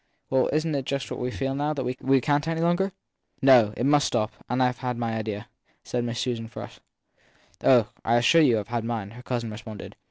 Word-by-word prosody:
Well, 130 -1 +3
isn 155 +1 0
t 140 - 0
just 135 +1 -3
what - - -4
we 125 - -2
feel 135 +1 -2
now 145 +2 -1
that 135 - -2
we 130 +1 +1
can 145 +3 +2
t 160 - -4
any 165 0 -1
longer? 175 +3 +1 0.5
No 125 -6 +6
it 120 - 0
must 145 0 +4
stop. 110 -2 0 0.2
And 125 +1 +2
I 125 - +3
ve 125 0 -4
my 115 -1 -2
idea/ 110 -1 -4 0.4
said 120 -1 -2
Susan 120 -2 -2
Frush. - - -9 0.8
Oh, 120 -5 +5 0.2
I 115 - +2
assure 120 +8 +5
you 125 -7 +4
I 105 - -1
ve 115 +1 -3
mine! 110 -4 -3
her 120 +2 -11
cousin 120 -3 -3
responded. 110 -1 -9
125 Hz, 215 wpm, -26 LUFS, 115-140 Hz, 0.8 s, No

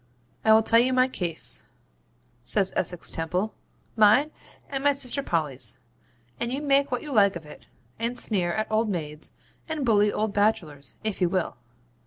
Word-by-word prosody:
'I 220 - +6
will 220 0 +5
tell 230 +1 +4
you 255 +2 +2
my 255 0 +4
case,' 175 -10 0 0.7
says 190 - +1
Essex 175 -1 0
Temple; 180 +6 -2 0.4
'mine 220 +8 +5 0.4
and 270 -1 -4
my 285 0 +4
sister 275 0 -1
Polly's, 140 - -1 0.6
and 235 0 -2
you 265 - -2
may 295 - -6
make 280 - -5
what 250 - -2
you 300 - -7
like 200 -6 +4
of 165 -2 -8
it; 150 - -14 0.3
and 235 +2 -2
sneer 185 -8 +1
at 215 +5 -1
old 220 0 +1
maids, 155 -5 -4 0.4
and 310 -4 -2
bully 210 -3 +3
old 215 -1 -2
bachelors, 155 - -1
if 215 -3 -3
you 180 - +3
will. 185 -2 -1
210 Hz, 175 wpm, -26 LUFS, 175-245 Hz, 0.7 s, I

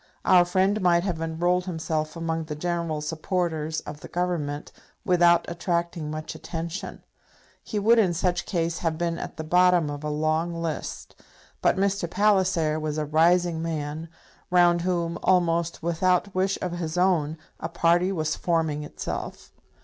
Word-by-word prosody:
Our 180 -1 +6
friend 190 +4 +1
might 175 -1 +3
have 175 -4 -2
enrolled 175 +3 0
himself 160 -3 -3
among 165 -1 -2
the 155 -1 -5
general 170 -1 -2
supporters 160 0 -2
of 150 0 -8
the - - -10
Government 165 -5 -2 0.3
without 175 -1 +4
attracting 170 -2 -2
much 155 0 -5
attention. 170 +4 -6 0.6
He 215 - -4
would 225 +3 +4
in 180 -6 +2
such 175 +1 0
case 165 -3 -1
have 165 -2 -1
been 170 0 -1
at - - -7
the 160 - -4
bottom 180 -1 +3
of 145 +1 -6
a 150 - -2
long 155 +3 0
list. 165 -2 -5 0.4
But - - +3
Mr. 195 -2 0
Palliser 185 -6 +2
was 155 -1 -3
a 155 - -1
rising 165 +2 +3
man, 160 0 -4 0.4
round 175 -1 +4
whom, 170 -1 -1
almost 170 -2 +1
without 180 +3 +1
wish 190 +1 +1
of 180 - -2
his 170 -1 -4
own, 170 -4 +2 0.2
a - - -4
party 175 +3 +2
was 155 -4 -1
forming 160 -3 0
itself. - - -6
170 Hz, 155 wpm, -25 LUFS, 160-180 Hz, 0.6 s, Our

